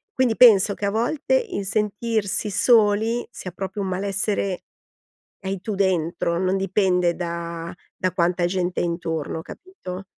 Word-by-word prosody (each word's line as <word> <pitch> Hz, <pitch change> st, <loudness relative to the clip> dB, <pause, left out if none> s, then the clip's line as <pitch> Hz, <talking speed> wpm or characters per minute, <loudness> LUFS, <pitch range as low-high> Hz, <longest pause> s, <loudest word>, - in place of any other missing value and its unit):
quindi, 245 Hz, -4 st, +2 dB
penso 210 Hz, -4 st, +6 dB
che 205 Hz, -, -4 dB
a 200 Hz, -, +1 dB
volte 250 Hz, -, -1 dB
il 395 Hz, -, -1 dB
sentirsi 210 Hz, 0 st, -1 dB
soli, 225 Hz, +1 st, +3 dB
sia 185 Hz, -, -7 dB
proprio 195 Hz, +2 st, -5 dB
un 195 Hz, -, -2 dB
malessere 195 Hz, 0 st, -1 dB, 0.8 s
che -, -, -12 dB
hai 195 Hz, -1 st, -3 dB
tu 210 Hz, 0 st, -4 dB
dentro, 170 Hz, -3 st, 0 dB
non 185 Hz, +1 st, +1 dB
dipende 185 Hz, -2 st, +1 dB
da 170 Hz, -1 st, -5 dB, 0.2 s
da 185 Hz, -4 st, -1 dB
quanta 175 Hz, 0 st, +1 dB
gente 180 Hz, 0 st, -1 dB
hai 175 Hz, -, +1 dB
intorno, 165 Hz, -2 st, -3 dB
capito? 195 Hz, -, -9 dB
195 Hz, 145 wpm, -23 LUFS, 175-215 Hz, 0.8 s, penso